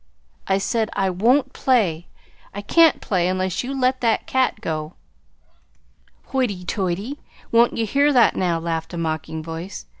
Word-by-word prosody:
"I 190 - +2
say 220 +3 0
I 190 -1 0
won't 250 +9 +2
play 190 -11 +1 0.5
I 205 - -4
can't 330 +8 +4
play 180 -3 0
unless 185 +1 -1
you 270 +2 -4
let 255 0 +1
that 230 -2 +1
cat 260 -4 0
go." 155 -5 -4 1.3
"Hoity 220 -9 -1
toity! 195 +10 -3 0.3
Won't 235 +1 +4
ye 225 - 0
hear 280 +7 +3
that 245 -4 +4
now?" 175 -2 0
laughed 165 +1 -4
a - - -5
mocking 160 -1 -3
voice. 165 +4 -7
195 Hz, 150 wpm, -22 LUFS, 170-250 Hz, 1.3 s, can't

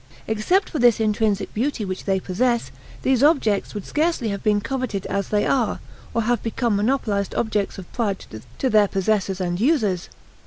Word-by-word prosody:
Except 220 - +1
for 310 - -2
this 240 -2 +5
intrinsic 215 -2 0
beauty 235 -1 -1
which 185 -1 -5
they 195 -1 +1
possess, 215 - 0 0.3
these 260 -2 +2
objects 265 -10 +2
would 205 - -5
scarcely 305 -7 0
have 200 -1 -3
been 210 -1 +2
coveted 250 -4 -3
as 200 0 -2
they 210 -1 +1
are, 250 -5 +1 0.3
or 230 - 0
have 240 0 +1
become 230 -1 0
monopolized 205 -3 0
objects 210 -3 -1
of 185 -3 -10
pride 205 -5 -2 0.3
to 260 - 0
their 210 -1 +5
possessors 195 0 0
and 175 -1 -1
users. 220 - +1
215 Hz, 170 wpm, -23 LUFS, 200-245 Hz, 0.3 s, this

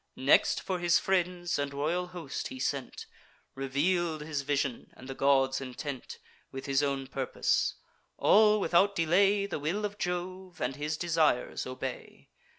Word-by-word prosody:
Next, - - +4
for 185 -1 -3
his 175 -1 +4
friends 180 -3 0
and 140 0 -3
royal 170 +5 -1
host 175 -6 -5
he 130 - -8
sent, 135 0 -3 0.5
Reveal'd 155 +5 0
his 150 -2 -3
vision, 140 -3 -2
and 130 - -12
the 135 - -5
gods' 135 -1 +2
intent, 130 0 -6 0.3
With 135 - -7
his 140 0 +2
own 140 -2 -1
purpose. 130 -1 0 0.4
All, 215 0 +5
without 195 +1 +3
delay, 195 +5 +3
The 190 -6 -4
will 175 +9 -1
of 205 0 -6
Jove, 180 0 -4
and 125 +2 -2
his 150 +2 -3
desires 160 -9 +1
obey. 130 0 -7
155 Hz, 150 wpm, -30 LUFS, 135-180 Hz, 0.5 s, All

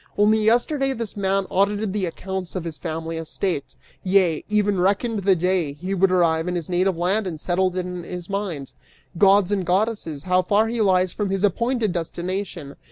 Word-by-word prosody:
Only 215 +1 +4
yesterday 270 +5 +2
this 230 -4 -5
man 195 -1 0
audited 200 +1 +1
the 200 -3 -1
accounts 190 +2 -5
of 185 - -2
his 165 -3 -6
family 165 +1 -4
estate, 165 -1 -3 0.3
yea, 185 -4 +2
even 205 -2 +1
reckoned 205 +4 +1
the 195 -1 +3
day 175 -4 0
he 180 +7 -5
would 190 0 +3
arrive 165 -2 +2
in 180 - -1
his 170 -2 -4
native 180 0 +1
land 190 +4 0
and 160 -4 -5
settled 185 +2 0
it 180 - -1
in 180 -1 -5
his 175 0 -7
mind! 190 -9 -4 0.5
Gods 200 -1 +5
and 200 -2 +1
goddesses, 180 -5 -1
how 185 0 +3
far 210 +4 +2
he 235 -1 -1
lies 185 -3 +3
from 205 -2 -2
his 195 0 -1
appointed 230 +1 +1
destination! 175 -3 -4
190 Hz, 185 wpm, -23 LUFS, 175-205 Hz, 0.5 s, Gods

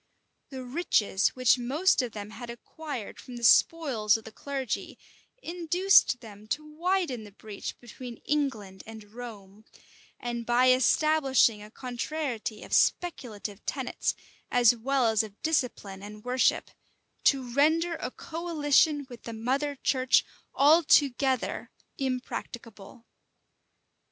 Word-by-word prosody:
The 260 -2 -7
riches 245 - +1
which 255 0 +4
most 290 +9 +2
of 245 -2 -4
them 210 0 -7
had 235 +2 -9
acquired 255 0 -7
from 250 - -10
the 240 - -8
spoils 235 -5 +4
of 225 - -12
the 225 - -10
clergy, 270 -1 -4 0.5
induced 350 -5 +3
them 215 -2 -12
to 300 +7 -3
widen 320 - -1
the 205 - -12
breach 205 0 -8
between 240 0 -10
England 230 -11 -2
and 220 -2 -11
Rome; 215 -4 -10 0.6
and 240 -1 -4
by 245 +2 +4
establishing 265 -3 +3
a 210 - -11
contrariety 245 -2 -4
of - - -9
speculative 220 - 0
tenets, 265 -3 -2 0.3
as 245 -1 +5
well 260 +2 0
as 220 -2 +3
of 215 -2 -10
discipline 250 -11 -1
and 210 +1 -10
worship, 250 +1 +1 0.5
to 260 -4 +2
render 320 +5 +3
a 250 - -4
coalition 305 -2 +1
with 245 -3 -11
the 230 - -7
mother 270 +6 -1
church 260 -1 +2 0.3
altogether 280 -4 +3 0.3
impracticable. 240 -4 -6
250 Hz, 120 wpm, -28 LUFS, 220-290 Hz, 0.6 s, as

